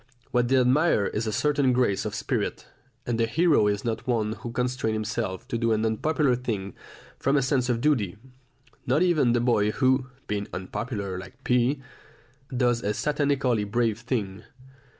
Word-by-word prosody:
What 120 0 +2
they 135 +2 +3
admire 130 -2 +3
is 110 +3 -2
a - - 0
certain 140 +2 +2
grace 120 -6 +1
and 105 - -3
spirit, - - -2 0.4
and 120 -1 -1
the 115 - +2
hero 150 -4 +3
is 105 +1 -1
not 115 +1 -3
one 110 -4 +1
who 115 +2 -7
constrains 125 -2 -1
himself 110 -3 -3
to 115 - -1
do 115 -1 +2
an 110 +1 0
unpopular 135 +4 +1
thing 105 -6 -4 0.5
from 140 +1 +2
a 135 - +2
sense 130 -2 +1
of 120 -1 0
duty, 115 -11 +1 0.7
not 145 +8 +3
even 155 -9 +3
the 120 - +2
boy 115 -4 +2
who, 130 +2 +2 0.2
being 105 -1 -3
unpopular 100 0 -4
like 95 0 -12
P, 125 +3 +1 0.7
does 120 -2 +1
a 105 0 -1
satanically 140 -6 +1
brave 115 -1 +1
thing. 110 -5 -3
120 Hz, 170 wpm, -26 LUFS, 105-130 Hz, 0.7 s, they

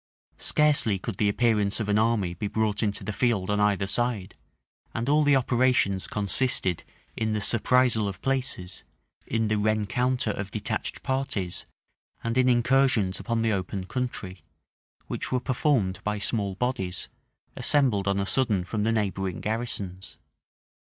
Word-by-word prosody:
Scarcely 145 -9 +2
could 95 +1 -6
the 105 - +2
appearance 105 -2 +1
of 110 - -2
an 105 +1 +2
army 110 -6 +1
be 95 +4 -3
brought 105 0 0
into 105 -2 -1
the 105 - -3
field 105 -5 +1
on 105 - +1
either 105 -1 +2
side; 110 -2 -1 0.6
and 115 +2 -2
all 150 +2 +4
the 145 -1 +4
operations 125 -6 +2
consisted 100 -3 +1 0.3
in 110 -1 -1
the 105 - 0
surprisal 115 0 +3
of 95 -2 -5
places, 130 -9 -2 0.4
in 115 -1 0
the 110 0 +1
rencounter 110 +3 +1
of 95 -1 -5
detached 105 0 -3
parties, 105 -10 -2 0.6
and 115 0 -1
in 130 0 +4
incursions 120 -6 +3
upon 115 -1 -1
the 115 -1 +2
open 95 0 -3
country; 100 -6 -5 0.6
which - - -4
were 125 - +2
performed 125 -6 0
by 105 0 -1
small 100 -2 -2
bodies, 95 -6 -2 0.5
assembled 120 -9 +2
on 100 0 +1
a 100 - 0
sudden 110 -5 +1
from 105 +4 -3
the 110 +2 +2
neighboring 95 -4 -1
garrisons. 105 -5 -3
110 Hz, 150 wpm, -26 LUFS, 100-125 Hz, 0.6 s, all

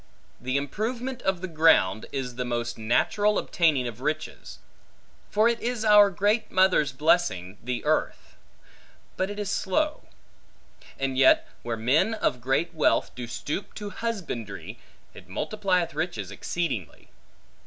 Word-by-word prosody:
The 130 +2 -1
improvement 235 - -3
of 190 -2 -1
the 185 - -3
ground, 155 - +3
is 130 -3 -3
the 125 +1 -3
most 120 -1 -2
natural 205 - +1
obtaining 150 -8 +1
of 120 +1 -8
riches; 155 +2 -4 0.7
for 215 +2 +3
it 235 0 +1
is 235 -2 -2
our 210 -1 +7
great 205 +3 +1
mother's 185 -6 +3
blessing, 130 - +1
the 125 0 -3
earth's; - - -1 0.8
but 190 +1 -1
it 205 - -6
is 205 -1 -3
slow. 300 +14 -1 0.9
And 135 -1 -1
yet 135 - +5
where 115 -1 -3
men 150 - +2
of 125 - -1
great 135 +7 0
wealth 155 - +2
do 125 -1 -6
stoop 145 - -5
to 205 -1 -6
husbandry, 185 - -5 0.3
it - - -14
multiplieth 180 - -1
riches 165 +3 -3
exceedingly. 140 - -4
165 Hz, 135 wpm, -26 LUFS, 125-205 Hz, 0.9 s, our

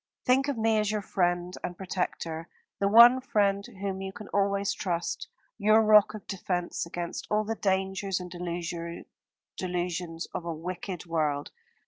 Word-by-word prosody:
Think 265 +2 +4
of 280 -4 -1
me 220 -1 +3
as 210 -1 +1
your 210 -1 -1
friend 175 -1 0
and 175 - -4
protector, 170 -3 -3 0.3
the 200 - +2
one 235 +5 +8
friend 200 -5 +1
whom 195 -1 -5
you 190 0 -4
can 205 +1 -10
always 200 0 +1
trust, 175 -3 -2 0.3
your 215 +1 +5
rock 215 0 +6
of 210 - -9
defence 180 -3 -2
against 170 0 -5
all 210 0 +2
the 220 +1 -2
dangers 190 -1 0
and 180 -1 -8 1.3
delusions 175 -2 -3
of - - -3
a 170 -1 -3
wicked 180 +2 -5
world. 150 -4 -1
190 Hz, 150 wpm, -28 LUFS, 175-210 Hz, 1.3 s, one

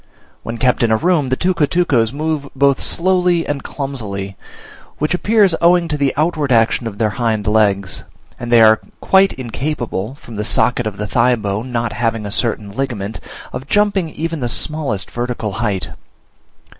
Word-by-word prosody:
When 115 +1 -5
kept 125 +1 +1
in 120 - +3
a 110 - +3
room, 160 -2 +1
the 130 - +2
tucutucos 165 -9 +1
move 150 0 -3
both 140 0 +2
slowly 180 -1 +2
and 145 -1 -3
clumsily, 105 -9 -5 0.6
which 150 +3 0
appears 205 0 +3
owing 175 0 +4
to 150 - 0
the 140 -2 +1
outward 155 -3 0
action 115 0 +2
of 105 -3 -7
their 110 -1 +1
hind 110 -3 0
legs; 100 -3 +1 0.4
and 120 0 -5
they 115 -1 +7
are 110 0 +5 0.2
quite 195 0 +4
incapable, 125 -3 -4
from 120 -6 -11
the 105 - -1
socket 120 +1 +1
of 105 -2 -5
the 105 - -3
thigh 125 +4 +2
bone 105 +3 -4
not 120 -2 -1
having 115 -1 -1
a 100 - -3
certain 110 -2 0
ligament, 110 -4 -4 0.3
of 130 - -6
jumping 205 -4 +1
even 165 +1 -4
the 120 -2 -2
smallest 140 -7 -1
vertical 120 -3 -3
height. 100 -2 -2
125 Hz, 170 wpm, -17 LUFS, 110-155 Hz, 0.6 s, they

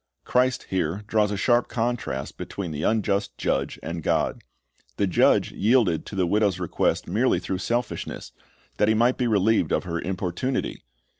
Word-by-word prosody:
Christ 125 0 +1
here 95 +2 -1
draws 105 -1 +2
a 100 - -2
sharp 120 +3 +3
contrast 115 - -2
between 95 -5 -5
the 75 -1 -4
unjust 100 0 0
judge - - -1
and 85 +2 -4
God. - - 0 0.6
The 100 - +2
judge 90 - +3
yielded 110 -7 +2
to - - -7
the 95 -2 +2
widow's 100 0 +1
request 90 - 0
merely - - +2
through 95 - -3
selfishness, 120 +5 -3 0.5
that 105 - +3
he 110 - +3
might 120 +3 +2
be 125 - +1
relieved 110 0 +2
of - - +1
her 85 -2 -3
importunity. 95 +8 -2
100 Hz, 160 wpm, -25 LUFS, 90-115 Hz, 0.6 s, sharp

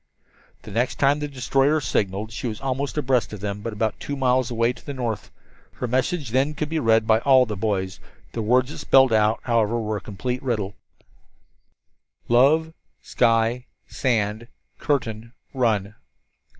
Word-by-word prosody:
The - - -10
next 120 +5 0
time 140 +1 +2
the 150 - -3
destroyer 135 +2 +1
signaled 105 -5 -2
she 115 - -4
was 110 -2 -5
almost 135 +2 -3
abreast 130 -6 +1
of 105 - -6
them, 100 +1 -4
but 115 - -4
about 110 +1 -2
two 145 - -4
miles 130 -2 +1
away 115 0 +1
to 120 - -17
the 140 - -6
north. 115 -6 -3 0.4
Her - - -4
message 130 +3 -1
then 135 +4 +1
could 150 +1 -3
be 160 0 -1
read 115 -4 +3
by 110 0 +4
all 130 0 +5
the 110 -2 -4
boys. 95 -3 -2 0.3
The 115 - -4
words 125 +5 +2
it - - -8
spelled 135 -3 +5
out, 110 +1 +2
however, 115 -1 +1
were 110 -1 -2
a - - -8
complete 125 +6 -4
riddle: 105 -6 -2 1.5
"Love 150 +7 +4 0.3
sky 115 +2 +1 0.2
sand 110 -3 -1 0.3
curtain 115 -5 -2 0.2
run." 110 -6 0
120 Hz, 165 wpm, -23 LUFS, 110-135 Hz, 1.5 s, all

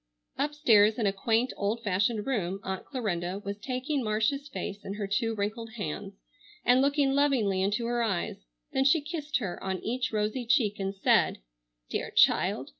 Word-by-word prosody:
Upstairs 235 -8 +4
in 230 - 0
a 195 - +2
quaint 225 +5 +1
old 215 +3 -2
fashioned 205 +2 0
room 195 -8 -1
Aunt 190 0 -4
Clarinda 190 -8 -2
was 200 +1 -4
taking 255 +4 -2
Marcia's 225 +7 0
face 205 -7 -6
in 195 - -5
her 205 -1 -3
two 225 +3 0
wrinkled 220 +2 -3
hands 200 -1 -5 0.5
and 250 +1 +5
looking 280 0 +2
lovingly 255 -10 +2
into 205 +4 0
her 240 0 0
eyes; 195 - -2 0.3
then 265 - +2
she 280 +4 +5
kissed 300 0 -3
her 195 -8 -5
on 190 -1 -1
each 250 +3 -1
rosy 215 +3 -1
cheek 225 -5 +2
and 195 0 -2
said: 195 - +3 0.5
"Dear - - -2
child! - - +3
220 Hz, 170 wpm, -29 LUFS, 200-260 Hz, 0.5 s, and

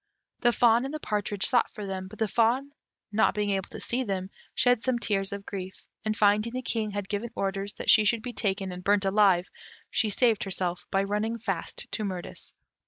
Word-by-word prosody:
The 240 - +4
fawn 235 0 +4
and 270 - -3
the 310 - -4
partridge 205 -5 0
sought 245 -3 +3
for 210 - -7
them, 190 -1 -4
but 215 +3 -12
the 220 - +1
fawn 240 +6 +2 0.4
not 220 +2 +3
being 205 -1 0
able 195 -1 -1
to - - -8
see 255 +2 -1
them, 190 -4 -3 0.3
shed 245 -2 +3
some 255 0 +1
tears 195 -4 0
of 200 0 -6
grief, 190 -1 -7 0.2
and 215 0 -1
finding 210 +3 +3
the 255 0 -3
King 220 -3 -1
had 205 -1 -4
given 210 +4 -3
orders 195 +1 -2
that - - +2
she 215 - +7
should 225 +1 +1
be 245 0 -5
taken 195 -3 -1
and 180 0 -7
burnt 200 0 +3
alive, 195 -3 +4 0.4
she 220 - +2
saved 225 +1 +2
herself 180 -2 -3
by 195 0 +2
running 210 +3 -1
fast 230 - -4
to 215 - -2
Mirtis. 185 -3 -6
205 Hz, 210 wpm, -28 LUFS, 195-230 Hz, 0.4 s, she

